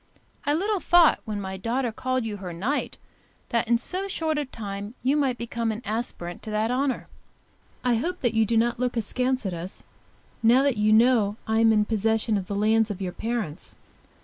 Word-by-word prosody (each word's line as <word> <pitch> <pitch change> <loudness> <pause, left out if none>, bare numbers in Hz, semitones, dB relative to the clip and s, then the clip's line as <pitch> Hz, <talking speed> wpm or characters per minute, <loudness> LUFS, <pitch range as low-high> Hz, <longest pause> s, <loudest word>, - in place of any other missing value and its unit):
I 290 - +3
little 400 +4 0
thought 350 -2 +5
when 210 -3 -3
my 190 -1 -5
daughter 235 +4 -1
called 255 +1 -2
you 210 -2 -4
her 185 -3 -6
knight, 230 - -2 0.5
that 235 -1 0
in 235 0 +4
so 370 +10 -2
short 320 -5 -1
a 295 - -2
time 205 -2 -7
you 265 +3 +3
might 270 -4 +1
become 235 -1 -2
an 220 +3 -6
aspirant 210 -5 -3
to - - -8
that 215 +2 0
honour. 260 0 -1 0.8
I 245 -2 +2
hope 355 +9 -3
that 240 -4 +1
you 225 0 +4
do 225 +1 +1
not 235 +1 +1
look 250 -1 -1
askance 255 +3 0
at 190 - -2
us, 175 +3 -5 0.6
now 240 +4 +5
that 275 -5 +1
you 210 +1 +3
know 220 -2 +4
I 220 0 +1
am 225 0 +5
in 210 -1 +3
possession 220 +1 +1
of 190 -2 -2
the 200 - -3
lands 220 +2 +3
of 200 -2 -4
your 185 -2 -3
parents. 220 -8 -4
225 Hz, 200 wpm, -25 LUFS, 210-255 Hz, 0.8 s, thought